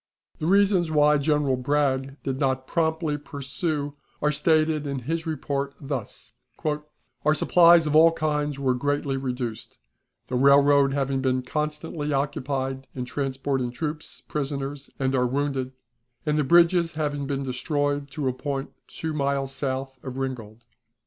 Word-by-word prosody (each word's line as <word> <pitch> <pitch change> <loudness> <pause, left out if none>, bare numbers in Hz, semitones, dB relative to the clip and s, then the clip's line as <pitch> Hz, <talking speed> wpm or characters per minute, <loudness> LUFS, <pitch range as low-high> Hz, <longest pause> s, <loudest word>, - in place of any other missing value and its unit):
The 155 - -2
reasons 195 -3 +4
why 150 -1 +4
General 145 -2 +2
Bragg 135 0 0
did 135 -1 -2
not 130 -2 0
promptly 160 -1 0
pursue 145 +1 -3 0.3
are 150 - +2
stated 155 0 +2
in 140 -2 -3
his 165 +6 -3
report 140 -3 -2
thus: 135 -6 -6 0.9
"Our 150 +1 +4
supplies 170 +1 +6
of 150 0 0
all 165 +1 +8
kinds 150 -3 -1
were 135 -2 +1
greatly 145 +1 -1
reduced, 125 -4 -4 0.5
the 130 - -4
railroad 140 +1 +5
having 135 -1 0
been 130 -1 +1
constantly 150 +2 -3
occupied 135 -1 -2
in 125 -1 -3
transporting 135 -1 -2
troops, 150 +5 -6
prisoners, 140 -1 -4
and 135 -1 0
our 125 -1 +2
wounded, 135 0 -1 0.5
and 150 -1 +1
the 150 - +2
bridges 170 +2 +4
having 145 -2 -2
been 140 -1 -2
destroyed 145 +2 -1
to 140 0 -3
a 130 - +1
point 140 +1 -4 0.2
two 160 -1 -5
miles 140 -2 0
south 135 -1 -3
of 130 -1 -7
Ringgold. 120 -4 -5
140 Hz, 140 wpm, -25 LUFS, 135-150 Hz, 0.9 s, all